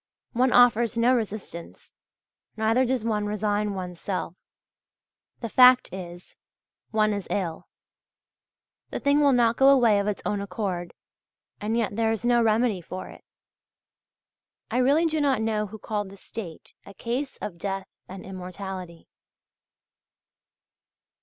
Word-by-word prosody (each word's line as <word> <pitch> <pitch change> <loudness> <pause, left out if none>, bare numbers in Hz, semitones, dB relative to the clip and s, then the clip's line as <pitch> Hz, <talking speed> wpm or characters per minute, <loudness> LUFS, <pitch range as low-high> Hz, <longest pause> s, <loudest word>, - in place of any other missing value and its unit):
One 250 +2 +2
offers 240 -1 +4
no 240 +2 +4
resistance, 215 -7 -5 0.6
neither 225 +4 +2
does 250 -2 -1
one 210 -2 0
resign 210 0 -1
one's 180 -2 -6
self; 185 -3 -3 1.1
the 230 - -3
fact 250 -3 +6
is, 175 -1 -9 0.5
one 215 -1 +2
is 200 -2 -4
ill; 170 -5 -3 1.2
the - - -4
thing 280 +1 +3
will 285 -1 +5
not 235 -2 +3
go 270 0 +6
away 235 -7 +5
of 200 - -1
its 210 - -3
own 205 -1 -1
accord, 180 -3 -4 0.6
and 220 +2 -1
yet 220 -3 -1
there 225 0 +1
is 225 +1 -3
no 240 0 +4
remedy 220 -3 +2
for 185 +2 -7
it. - - -14 1.5
I - - 0
really 285 +6 +3
do 315 -1 0
not 275 -5 +2
know 215 -1 -1
who 220 +2 -9
called 205 -1 -3
the 195 - -13
state 190 -5 -9
"a 200 - -13
case 255 +6 -3
of 170 -5 -7
death 195 0 -3 0.2
and 190 0 -9
immortality." 185 -2 -7
215 Hz, 140 wpm, -26 LUFS, 190-240 Hz, 1.5 s, fact